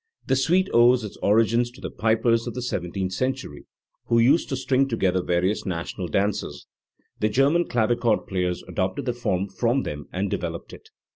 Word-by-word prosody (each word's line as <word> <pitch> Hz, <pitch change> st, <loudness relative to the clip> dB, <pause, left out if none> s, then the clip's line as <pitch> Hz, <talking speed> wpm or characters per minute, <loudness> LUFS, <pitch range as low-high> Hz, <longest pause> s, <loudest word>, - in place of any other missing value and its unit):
The 130 Hz, -, +2 dB
suite 175 Hz, +8 st, +2 dB
owes 120 Hz, +1 st, +5 dB
"its 105 Hz, -, -7 dB
origin 115 Hz, +3 st, +3 dB
to 120 Hz, +1 st, -10 dB
the -, -, -6 dB
pipers 115 Hz, +1 st, +1 dB
of 120 Hz, -, -5 dB
the 125 Hz, -, -4 dB
seventeenth 95 Hz, -4 st, -3 dB
century, 130 Hz, -, -3 dB, 0.4 s
who 115 Hz, -, +3 dB
used 125 Hz, +8 st, +4 dB
to 135 Hz, -, -1 dB
string 135 Hz, +1 st, +1 dB
together 95 Hz, -7 st, 0 dB
various 90 Hz, +4 st, 0 dB
national 90 Hz, 0 st, -4 dB
dances. 100 Hz, +5 st, -2 dB, 0.5 s
The 110 Hz, -, +1 dB
German 140 Hz, +10 st, +2 dB
clavichord 120 Hz, -1 st, +1 dB
players 90 Hz, -2 st, -2 dB
adopted 95 Hz, 0 st, -2 dB
the 125 Hz, -, 0 dB
form 100 Hz, -5 st, -1 dB
from 120 Hz, +7 st, 0 dB
them 75 Hz, -1 st, -6 dB
and 95 Hz, +2 st, -2 dB
developed -, -, -4 dB
it. -, -, -14 dB
115 Hz, 170 wpm, -24 LUFS, 95-125 Hz, 0.5 s, owes